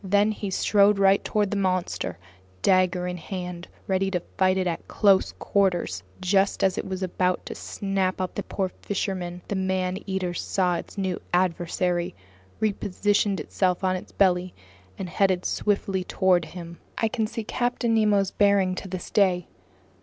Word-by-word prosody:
Then 205 Hz, +2 st, +3 dB
he 205 Hz, -1 st, -4 dB
strode 200 Hz, +1 st, +4 dB
right 195 Hz, 0 st, +4 dB
toward 210 Hz, -2 st, 0 dB
the 205 Hz, -, 0 dB
monster, 185 Hz, -, -1 dB, 0.5 s
dagger 185 Hz, -1 st, +3 dB
in 180 Hz, 0 st, -3 dB
hand, 180 Hz, 0 st, -6 dB, 0.2 s
ready 190 Hz, 0 st, +1 dB
to 180 Hz, -2 st, 0 dB, 0.2 s
fight 190 Hz, -1 st, +3 dB
it 185 Hz, -, +1 dB
at 170 Hz, -2 st, -3 dB
close 200 Hz, -3 st, +3 dB
quarters. 175 Hz, -, 0 dB, 0.2 s
Just 195 Hz, +2 st, +2 dB
as 190 Hz, -1 st, +3 dB
it -, -, -4 dB
was 190 Hz, 0 st, -3 dB
about 185 Hz, 0 st, 0 dB
to -, -, -5 dB
snap 195 Hz, -2 st, -2 dB
up 185 Hz, -1 st, -2 dB
the -, -, -3 dB
poor 190 Hz, -1 st, -2 dB
fisherman, 180 Hz, -3 st, -3 dB
the -, -, -2 dB
man 190 Hz, 0 st, -1 dB
eater 190 Hz, -2 st, -1 dB
saw 180 Hz, 0 st, 0 dB
its 170 Hz, -, -9 dB
new 190 Hz, -2 st, -2 dB
adversary, 175 Hz, 0 st, 0 dB, 0.4 s
repositioned 205 Hz, -1 st, +1 dB
itself 180 Hz, +4 st, 0 dB
on 185 Hz, 0 st, +2 dB
its 185 Hz, -, -7 dB
belly, 180 Hz, -2 st, +2 dB, 0.4 s
and 190 Hz, -, -4 dB
headed 185 Hz, 0 st, +1 dB
swiftly 195 Hz, -2 st, 0 dB
toward 180 Hz, -2 st, +2 dB
him. 170 Hz, -1 st, -9 dB, 0.2 s
I 225 Hz, -, +2 dB
can 220 Hz, -1 st, -1 dB
see 225 Hz, +1 st, -5 dB
Captain 240 Hz, +1 st, 0 dB
Nemo's 205 Hz, -3 st, +3 dB
bearing 200 Hz, -2 st, +3 dB
to 190 Hz, -, -6 dB
this 185 Hz, -1 st, -6 dB
day. 185 Hz, -4 st, +2 dB
190 Hz, 160 wpm, -25 LUFS, 180-200 Hz, 0.5 s, strode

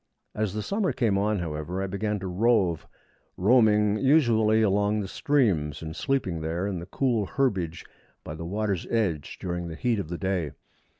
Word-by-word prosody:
As 105 Hz, -2 st, -2 dB
the 105 Hz, -, -2 dB
summer 200 Hz, -, 0 dB
came 115 Hz, -5 st, +1 dB
on, 105 Hz, +1 st, +1 dB
however, 85 Hz, +1 st, -4 dB
I -, -, -1 dB
began 105 Hz, +2 st, -2 dB
to 95 Hz, -, -4 dB
rove, 95 Hz, -3 st, +1 dB, 0.5 s
roaming 105 Hz, -1 st, +4 dB
usually 115 Hz, -6 st, +4 dB
along 105 Hz, +1 st, +2 dB
the 100 Hz, -, -3 dB
streams, 90 Hz, -, 0 dB
and 80 Hz, 0 st, -6 dB
sleeping 100 Hz, -, -1 dB
there 85 Hz, +4 st, -2 dB
in 100 Hz, -3 st, -2 dB
the 85 Hz, -, -8 dB
cool 115 Hz, -2 st, 0 dB
herbage 95 Hz, -12 st, -1 dB, 0.4 s
by 75 Hz, -, -6 dB
the 80 Hz, +2 st, -7 dB
water's 100 Hz, +1 st, -2 dB
edge 95 Hz, -11 st, -1 dB
during 90 Hz, -1 st, -4 dB
the 80 Hz, -, -6 dB
heat 115 Hz, +4 st, 0 dB
of 80 Hz, -, -5 dB
the 85 Hz, -, -4 dB
day. 95 Hz, -6 st, -2 dB
100 Hz, 175 wpm, -26 LUFS, 85-110 Hz, 0.5 s, roaming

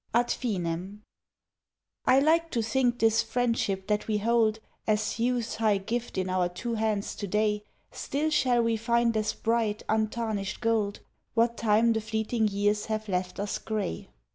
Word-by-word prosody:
AD 240 Hz, 0 st, +3 dB
FINEM 190 Hz, -2 st, -3 dB, 1.0 s
I 255 Hz, -, +6 dB
like 330 Hz, +3 st, +3 dB
to 235 Hz, -6 st, -1 dB
think 245 Hz, +1 st, +1 dB
this 225 Hz, -1 st, +3 dB
friendship 225 Hz, -5 st, -1 dB
that 210 Hz, 0 st, -1 dB
we 215 Hz, -1 st, +1 dB
hold 220 Hz, 0 st, +2 dB, 0.3 s
As 215 Hz, +1 st, 0 dB
youth's 240 Hz, -1 st, 0 dB
high 215 Hz, -2 st, +3 dB
gift 230 Hz, +3 st, -4 dB
in 185 Hz, 0 st, 0 dB
our 185 Hz, -1 st, +1 dB
two 235 Hz, +7 st, -4 dB
hands 215 Hz, -2 st, -1 dB
to 205 Hz, -, -4 dB
day 210 Hz, +1 st, 0 dB, 0.3 s
Still 300 Hz, +3 st, -2 dB
shall 250 Hz, -5 st, +3 dB
we 230 Hz, -1 st, +1 dB
find 235 Hz, +1 st, +1 dB
as 215 Hz, 0 st, 0 dB
bright, 225 Hz, -2 st, 0 dB
untarnished 215 Hz, -2 st, -1 dB
gold 220 Hz, -3 st, 0 dB, 0.3 s
What 235 Hz, +1 st, +3 dB
time 230 Hz, +1 st, +3 dB
the 220 Hz, -, -1 dB
fleeting 220 Hz, +1 st, 0 dB
years 205 Hz, +1 st, 0 dB
have 215 Hz, 0 st, -2 dB
left 180 Hz, -1 st, -2 dB
us 205 Hz, 0 st, -2 dB
grey. 215 Hz, -, -3 dB
220 Hz, 160 wpm, -28 LUFS, 210-235 Hz, 1.0 s, I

